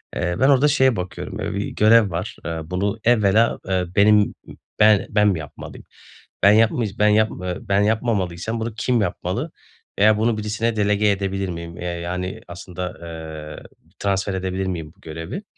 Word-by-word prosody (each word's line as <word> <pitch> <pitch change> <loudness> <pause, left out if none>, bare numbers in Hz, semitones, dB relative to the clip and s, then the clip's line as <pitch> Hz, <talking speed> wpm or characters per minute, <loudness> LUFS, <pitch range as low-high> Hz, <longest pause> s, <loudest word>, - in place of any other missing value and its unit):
Eee, 90 0 -1
ben 135 - +4
orada 140 +1 +5
şeye 130 -4 +3
bakıyorum, 90 -2 -6
ııı, - - -3
bir 100 +1 -2
görev 110 0 +4
var. 95 +7 -4
Eee, 80 -1 -3
bunu 100 +6 -2
evvela, 110 -1 +3
eee, 95 -1 0
benim, 105 0 +4 0.5
be 105 -2 +5
ben 105 -1 +3
mi 90 -5 0
yapmalıyım? 75 -2 -10 0.6
Ben 100 - +8
yapmıyc 110 -1 +2
ben 105 - +4
yap 110 +1 +3
eee, 90 -1 -3
ben 100 +1 +1
yapmamalıysam 110 -2 -1
bunu 115 0 -3
kim 120 0 +1
yapmalı 105 - -3 0.5
veya 105 +1 +5
bunu 110 0 +1
birisine 110 +2 -1
delege 105 0 +2
edebilir 95 -1 -1
miyim, 85 -1 -7
eee, - - -7
yani, 90 +4 -4
aslında, 90 +1 -6
eee, 80 -2 -8 0.4
transfer 100 0 -1
edebilir 95 0 -2
miyim 80 -4 -5
bu - - -27
görevi? 80 - -7
100 Hz, 165 wpm, -22 LUFS, 90-110 Hz, 0.6 s, Ben